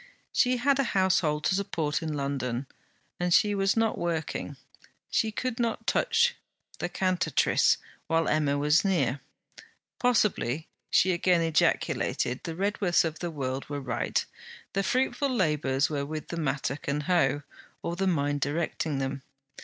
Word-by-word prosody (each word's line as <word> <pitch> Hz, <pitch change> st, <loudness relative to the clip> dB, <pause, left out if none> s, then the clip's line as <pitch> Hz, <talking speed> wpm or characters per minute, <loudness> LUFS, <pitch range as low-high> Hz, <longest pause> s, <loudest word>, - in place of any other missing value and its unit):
She 250 Hz, 0 st, +3 dB
had 275 Hz, +2 st, +2 dB
a -, -, +4 dB
household 170 Hz, -5 st, +2 dB
to -, -, +2 dB
support 180 Hz, -5 st, -1 dB
in 160 Hz, -1 st, -3 dB
London, 140 Hz, -3 st, -2 dB, 0.5 s
and 180 Hz, 0 st, 0 dB
she 205 Hz, +4 st, +5 dB
was 195 Hz, +2 st, +1 dB
not 225 Hz, -1 st, +1 dB
working; 165 Hz, -3 st, -3 dB, 0.5 s
she 220 Hz, -, +1 dB
could 250 Hz, +2 st, -3 dB
not 230 Hz, -2 st, -1 dB
touch 470 Hz, +1 st, +2 dB, 0.5 s
THE 175 Hz, -, -2 dB
CANTATRICE 185 Hz, 0 st, +2 dB, 0.3 s
while 165 Hz, 0 st, +2 dB
Emma 145 Hz, -2 st, +2 dB
was 150 Hz, +3 st, +3 dB
near. 145 Hz, -, +1 dB, 0.8 s
Possibly, 190 Hz, -, +1 dB, 0.2 s
she 185 Hz, -, +4 dB
again 175 Hz, 0 st, +2 dB
ejaculated, 150 Hz, -5 st, +1 dB
the 165 Hz, -, -4 dB
Redworths 195 Hz, -1 st, +2 dB
of 160 Hz, -1 st, -4 dB
the 175 Hz, -, -3 dB
world 135 Hz, -4 st, -4 dB
were 145 Hz, -1 st, -3 dB
right: 130 Hz, -4 st, -1 dB, 0.5 s
the 195 Hz, -, +1 dB
fruitful 265 Hz, +6 st, 0 dB
labours 150 Hz, -, +1 dB
were 145 Hz, -2 st, -2 dB
with 155 Hz, +2 st, -6 dB
the -, -, -4 dB
mattock 140 Hz, -3 st, -2 dB
and 145 Hz, +1 st, -1 dB
hoe, 145 Hz, -4 st, +2 dB, 0.4 s
or 170 Hz, -, -2 dB
the 190 Hz, +2 st, 0 dB
mind 145 Hz, -4 st, 0 dB
directing 150 Hz, 0 st, -1 dB
them. 135 Hz, 0 st, -3 dB
165 Hz, 145 wpm, -28 LUFS, 145-195 Hz, 0.8 s, she